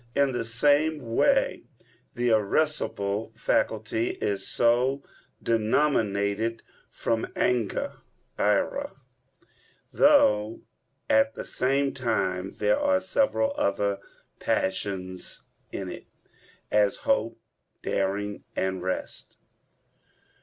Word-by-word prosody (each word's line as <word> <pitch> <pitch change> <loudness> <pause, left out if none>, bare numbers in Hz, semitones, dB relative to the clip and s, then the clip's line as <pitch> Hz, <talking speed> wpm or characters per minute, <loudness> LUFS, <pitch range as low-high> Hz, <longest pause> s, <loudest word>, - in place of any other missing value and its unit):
In 140 -1 +3
the 120 - -2
same 145 +2 +2
way - - +3 0.5
the 120 0 +1
irascible 110 -2 0
faculty 110 0 0
is 100 -1 -1
so 125 +4 +2 0.4
denominated 110 -2 +1 0.3
from 115 -1 -1
anger 120 -5 0 0.4
[ira]; - - 0 1.0
though 105 +1 +4 0.5
at 110 0 +3
the - - -6
same 135 +2 0
time 95 -7 -1
there 105 0 +2
are 285 -1 +3
several 275 0 +1
other 100 - 0 0.4
passions 95 -1 -2 0.3
in 95 - -4
it, - - -10 0.6
as 105 -1 +3
hope, 275 - +1 0.4
daring, 100 +1 -2
and 95 0 -1
the 90 - -8
rest. 95 - -4
110 Hz, 90 wpm, -27 LUFS, 100-130 Hz, 1.0 s, though